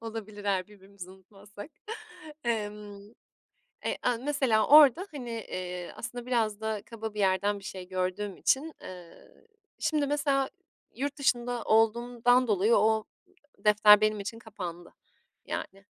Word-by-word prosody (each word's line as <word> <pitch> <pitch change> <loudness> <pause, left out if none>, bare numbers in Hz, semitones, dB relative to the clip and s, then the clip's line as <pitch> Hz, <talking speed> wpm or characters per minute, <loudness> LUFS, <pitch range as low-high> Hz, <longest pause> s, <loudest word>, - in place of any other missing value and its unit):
Olabilir 220 -2 -7
eğer 190 -2 0
birbirimizi 200 -2 -13
unutmazsak. 200 - -13 0.7
Emm. 210 -3 -3 0.8
Eee, - - -2
a, 245 - +1
mesela 260 -5 +1
orada 305 +5 +7
hani, 250 -5 -7
eee, 180 -5 -5
aslında 245 0 -7
biraz 220 -4 0
da 220 -2 -3
kaba 220 -2 -7
bir 210 - -3
yerden 200 +2 +1
bir 195 - -15
şey 185 -1 -8
gördüğüm 185 +2 -3
için, 305 +4 0
ııı, 180 - -13 0.3
şimdi 305 -2 0
mesela 280 -2 0 0.5
yurt 285 +3 -3
dışında 245 -3 0
olduğumdan 240 +3 +3
dolayı 210 +2 +3
o 220 +1 +3 0.5
defter 210 0 +6
benim 215 -1 +1
için 220 +3 -6
kapandı 180 -6 -8 0.5
yani. 195 +1 -6
215 Hz, 130 wpm, -29 LUFS, 200-245 Hz, 0.8 s, orada